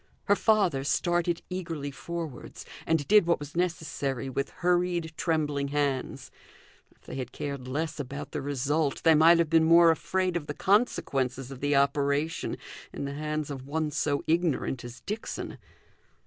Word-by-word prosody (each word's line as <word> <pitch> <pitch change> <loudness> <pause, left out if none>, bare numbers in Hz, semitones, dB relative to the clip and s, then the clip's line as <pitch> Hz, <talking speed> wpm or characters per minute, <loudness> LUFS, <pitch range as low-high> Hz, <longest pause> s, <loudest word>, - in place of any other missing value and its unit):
Her 205 - +3
father 195 -12 +2
started 175 +3 0
eagerly 165 -6 -4
forwards, 160 -1 -7 0.2
and 160 -3 +1
did 210 -4 +6
what 170 - +3
was 145 +1 -9
necessary 155 -7 -2
with 140 +2 -2
hurried 175 -2 0
trembling 150 -4 0
hands. 140 -2 -2 0.6
If - - -30
they - - -10
had 125 -2 -5
cared 140 -3 -5
less 150 +4 -3
about 75 - -6
the - - -3
result, 145 +2 -1
they 165 - +6
might 165 +2 +7
have 170 -2 +1
been 165 -1 +5
more 165 0 +7
afraid 185 +2 -1
of 160 -4 -3
the 145 - -4
consequences 135 - +1
of 135 - -8
the 145 +1 +1
operation 140 +3 +1 0.3
in - - -5
the 140 - -4
hands 150 0 -3
of 135 -1 -7
one 155 +1 -1
so 145 0 0
ignorant 160 -6 0
as 120 +1 -9
Dixon. 210 +2 -5
150 Hz, 160 wpm, -28 LUFS, 140-170 Hz, 0.6 s, might